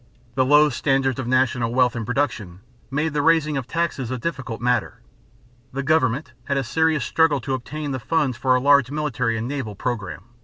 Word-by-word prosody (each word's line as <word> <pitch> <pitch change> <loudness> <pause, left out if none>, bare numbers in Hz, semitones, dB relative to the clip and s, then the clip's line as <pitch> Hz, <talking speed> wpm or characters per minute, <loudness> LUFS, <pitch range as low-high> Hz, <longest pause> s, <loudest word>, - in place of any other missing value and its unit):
The 130 - +2
low 150 +3 +5
standards 135 0 0
of 125 - -3
national 125 -2 +1
wealth 125 -1 +3
and 115 -2 -4
production 115 -9 -2 0.3
made 150 +3 -1
the 150 - +1
raising 155 -1 +3
of 135 -3 -3
taxes 165 -7 -2
a 130 - -2
difficult 130 -4 -4
matter. 125 0 0 0.7
The 140 +1 -3
government 140 -2 +1
had 140 -1 -1
a 135 - 0
serious 155 +2 +1
struggle 160 -3 +2
to 135 +2 -3
obtain 145 +3 -4
the 130 - -3
funds 135 +2 0
for 130 +1 +2
a - - +3
large 140 -1 +4
military 130 -6 -1
and 115 +2 -3
naval 130 -7 -4
program. 100 -4 -4
135 Hz, 190 wpm, -22 LUFS, 120-150 Hz, 0.7 s, low